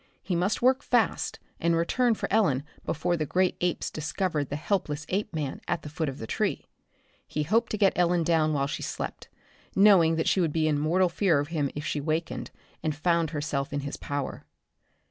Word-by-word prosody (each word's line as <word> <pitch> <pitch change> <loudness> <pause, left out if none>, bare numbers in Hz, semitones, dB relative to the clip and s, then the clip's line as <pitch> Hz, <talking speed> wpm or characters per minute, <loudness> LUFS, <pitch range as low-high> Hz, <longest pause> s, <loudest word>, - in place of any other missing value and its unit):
He 185 - -1
must 185 +7 0
work 260 +2 +4
fast, 240 -6 +1 0.2
and 170 0 +2
return 230 +8 +2
for - - -3
Ellen 150 -12 +3 0.2
before 175 +3 0
the 155 -3 -2
great 185 +3 +2
apes 175 -1 -1
discovered 155 -2 -2
the 145 - -3
helpless 150 -2 -1
Apeman 170 -8 -2
at 165 - -1
the 150 - -6
foot 160 -1 -2
of 135 - -7
the - - -6
tree. - - -1 0.6
He 150 - -2
hoped 225 +9 +2
to 215 - -2
get 195 -2 +4
Ellen 175 -1 +2
down 160 -2 +2
while 140 -2 +1
she 145 - -4
slept, - - -5 0.5
knowing 190 -5 +6
that 160 - 0
she 190 - +3
would 160 -4 0
be 160 -1 +2
in 150 -2 +1
mortal 175 +5 +3
fear 175 -2 +2
of 145 +1 -1
him 150 -4 0
if 150 +1 -4
she 150 - -1
wakened 160 +3 -2 0.3
and 155 -2 -1
found 170 0 +1
herself 145 -2 -2
in 145 0 -2
his 140 +1 -5
power. 145 -1 -4
165 Hz, 200 wpm, -27 LUFS, 150-185 Hz, 0.6 s, knowing